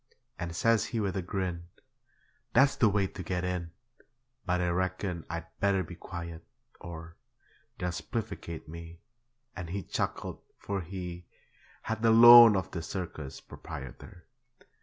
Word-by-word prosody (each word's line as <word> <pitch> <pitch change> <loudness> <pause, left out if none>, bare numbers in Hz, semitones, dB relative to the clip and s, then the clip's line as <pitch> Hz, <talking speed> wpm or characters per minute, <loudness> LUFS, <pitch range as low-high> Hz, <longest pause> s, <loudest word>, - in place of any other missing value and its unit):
And 85 -1 -4
says 115 +3 +3
he 115 - -3
with 100 -3 -1
a 95 - 0
grin, 90 -2 -3 0.9
'That's 135 +3 +5
the 115 - +5
way 100 -1 +2
to 95 0 -7
get 90 0 -2
in; 90 -2 -2 0.8
But 90 0 +1
I 90 -1 +1
reckon 95 -1 -2
I'd 85 -1 -4
better 100 -2 +2
be 90 - -9
quiet 85 -2 -7 0.4
or 85 -1 -9 0.6
They'll 90 0 -2
spiflicate 100 -3 -5
me,' 85 +1 -9 0.6
And 90 -3 -6
he 95 +2 -3
chuckled, - - -3 0.2
for 100 -1 -3
he 90 -1 -7 0.6
Had 110 0 -3
the 115 - +4
loan 120 -1 +10
of 95 -2 -2
the 85 - -4
circus 80 -5 -6
proprietor. 85 +7 -10
90 Hz, 140 wpm, -30 LUFS, 85-100 Hz, 0.9 s, loan